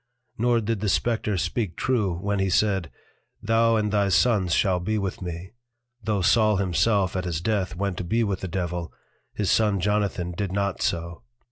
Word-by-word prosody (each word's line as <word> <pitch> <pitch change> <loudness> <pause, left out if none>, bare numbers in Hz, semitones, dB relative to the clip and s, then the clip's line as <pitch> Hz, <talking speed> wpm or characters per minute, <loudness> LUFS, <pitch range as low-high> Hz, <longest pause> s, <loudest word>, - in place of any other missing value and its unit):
Nor 120 0 +2
did 110 0 -2
the 105 0 -1
Spectre 110 -2 0
speak 90 +1 -2
true, 105 -9 0
when 100 +2 -1
he 95 0 +1
said, 95 -3 +1 0.5
Thou 115 0 +2
and 105 -1 0
thy 100 -1 +2
Sons 95 0 +3
shall 90 +1 +2
be 110 +5 -1
with 95 -2 -3
me: 90 +1 -6 0.5
Tho' 105 -2 -1
Saul 110 +2 +4
himself 95 +1 +1
at 90 -1 -2
his 85 -3 -2
Death 95 -1 -1
went 100 0 -2
to - - -3
be 115 +7 +1
with 100 -3 -1
the 95 - -4
Devil, 90 -2 -3 0.4
his 105 -3 0
Son 105 -3 +2
Jonathan 100 -2 0
did 95 +2 -3
not 100 -1 -1
so. 85 -4 -2
100 Hz, 180 wpm, -25 LUFS, 90-105 Hz, 0.5 s, Saul